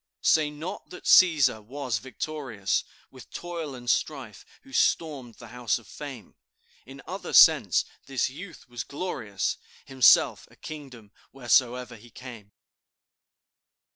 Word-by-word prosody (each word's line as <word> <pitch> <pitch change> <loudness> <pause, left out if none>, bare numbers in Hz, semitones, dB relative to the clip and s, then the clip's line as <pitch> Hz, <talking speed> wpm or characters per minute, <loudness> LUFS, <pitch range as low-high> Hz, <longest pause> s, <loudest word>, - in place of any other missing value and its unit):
"Say 155 -2 +4
not 150 +4 -8
that - - -11
Cæsar 145 -11 +5
was 125 -1 -3
victorious, 125 - -3 0.3
With - - -14
toil 170 -5 -6
and 120 -1 -11
strife 130 -4 -2 0.2
who 270 - -17
stormed 140 - 0
the - - -13
House 120 -4 -1
of 120 - -14
Fame; 135 -1 -9 0.5
In - - -12
other - - -7
sense - - +6 0.2
this 135 -2 0
youth 165 +6 -11
was 120 -2 -6
glorious, 120 - -3 0.3
Himself 130 -2 +4
a - - -20
kingdom 130 -9 -10 0.2
wheresoe'er 125 -1 +1
he 120 +3 -16
came. 115 -4 -11
130 Hz, 125 wpm, -26 LUFS, 115-150 Hz, 0.5 s, sense